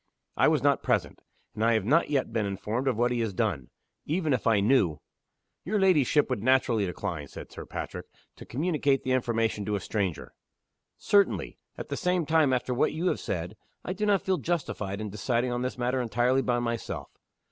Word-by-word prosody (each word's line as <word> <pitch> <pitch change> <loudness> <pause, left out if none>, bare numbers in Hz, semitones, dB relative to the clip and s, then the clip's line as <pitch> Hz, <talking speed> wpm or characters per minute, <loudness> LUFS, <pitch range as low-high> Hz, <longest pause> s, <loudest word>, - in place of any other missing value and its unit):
I - - +4
was - - +2
not - - +3
present; - - -1 0.3
and 110 - -3
I 115 +1 +4
have 110 -4 +1
not 155 +8 +3
yet 135 -5 0
been 110 -3 0
informed 105 +6 -3
of 125 -5 +1
what 120 +1 +2
has 115 -4 -1
been 110 +4 +2
done. 70 - -5 0.4
Even 160 -1 +1
if 125 - -1
I 110 -3 +4
knew 100 - +3 0.3
" - - -54
"Your 210 +3 0
ladyship 150 -6 +4
would 125 -6 -2
naturally 120 -4 +2
decline," 80 -4 -4
said - - -10
Sir - - -9
Patrick, - - -6 0.3
"to - - -10
communicate 145 -1 0
the 130 - -1
information 115 -4 0
to 105 - -1
a - - -1
stranger." 95 -3 -3 0.6
"Certainly. 200 -1 +1 0.2
At - - -7
the - - -3
same 180 -2 +1
time, 155 -3 +3
after 125 0 0
what 125 - +1
you 170 +4 0
have - - -1
said, 90 +2 -4 0.3
I 185 - -2
do 210 +2 -2
not 200 -2 +3
feel 190 -1 +1
justified 105 - -3
in 105 -2 -5
deciding 120 +4 -1
on 120 0 -2
this 125 0 -3
matter 125 +1 0
entirely 125 +3 +2
by 120 -2 0
myself. 115 -1 -3
125 Hz, 200 wpm, -28 LUFS, 105-145 Hz, 0.6 s, I